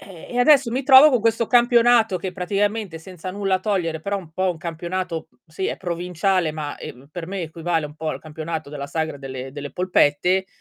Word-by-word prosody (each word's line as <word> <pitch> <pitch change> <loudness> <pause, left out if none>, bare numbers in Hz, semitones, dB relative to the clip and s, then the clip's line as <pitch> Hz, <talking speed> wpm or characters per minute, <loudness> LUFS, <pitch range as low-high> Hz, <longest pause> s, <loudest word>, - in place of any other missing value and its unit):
Eh, 185 -5 -12
e 245 - -3
adesso 270 -1 +5
mi 260 +3 -1
trovo 265 +2 +9
co' 250 -5 +2
questo 230 +1 +1
campionato 240 -3 +4
che 185 +1 -5
praticamente, 200 -1 -1
senza 185 +1 -8
nulla 190 -1 0
togliere, 175 -6 -1
però 200 +4 -2
un 165 -4 -12
po' 185 +2 0
un 175 - -5
campionato 170 +1 -4 0.2
sì 165 +4 -4
è - - -2
provinciale, 180 0 -1
ma, 150 -1 -5
ehm, 130 +3 -10
per 170 0 -6
me 195 -2 -3
equivale 165 0 -2
un 150 - -13
po' 160 0 -4
al - - -4
campionato 155 0 -6
della 140 -1 -5
sagra 160 -1 -2
delle 130 -1 -7
delle 145 0 -6
polpette 180 +1 +2
180 Hz, 200 wpm, -22 LUFS, 160-200 Hz, 0.2 s, trovo